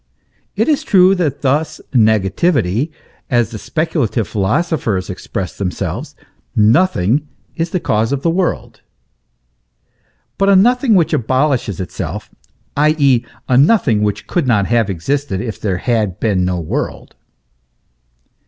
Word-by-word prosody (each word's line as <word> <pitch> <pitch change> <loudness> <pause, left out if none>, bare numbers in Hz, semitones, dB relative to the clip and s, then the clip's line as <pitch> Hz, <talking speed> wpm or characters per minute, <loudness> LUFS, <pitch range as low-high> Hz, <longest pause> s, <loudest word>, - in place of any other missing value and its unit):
It 220 +4 +1
is 300 -3 +1
true 190 -1 +5
that 155 -8 -2
thus, 145 +4 0
negativity, 110 - +2 0.4
as 120 -4 +1
the 110 - -7
speculative 120 - -1
philosophers 110 - -1
express 90 -1 -5
themselves 95 -2 -4 0.4
nothing 120 - +2 0.3
is 165 0 -2
the 180 - -1
cause 110 -5 0
of 140 -1 -2
the 165 - +2
world; 180 +1 -2 1.6
but 195 0 +3
a 200 - +6
nothing 245 +3 +4
which 170 -4 +2
abolishes 130 - 0
itself, 95 - -6 0.4
i.e. 145 -5 +3 0.2
a 125 0 +4
nothing 140 - +3
which 105 -1 -1
could 170 -7 -1
not 105 -5 +2
have 115 -2 +1
existed 100 - -2
if 110 0 -5
there 95 -4 -1
had 105 -3 -1
been 100 -5 +1
no 90 -1 -1
world. 80 - -4
125 Hz, 125 wpm, -16 LUFS, 105-165 Hz, 1.6 s, a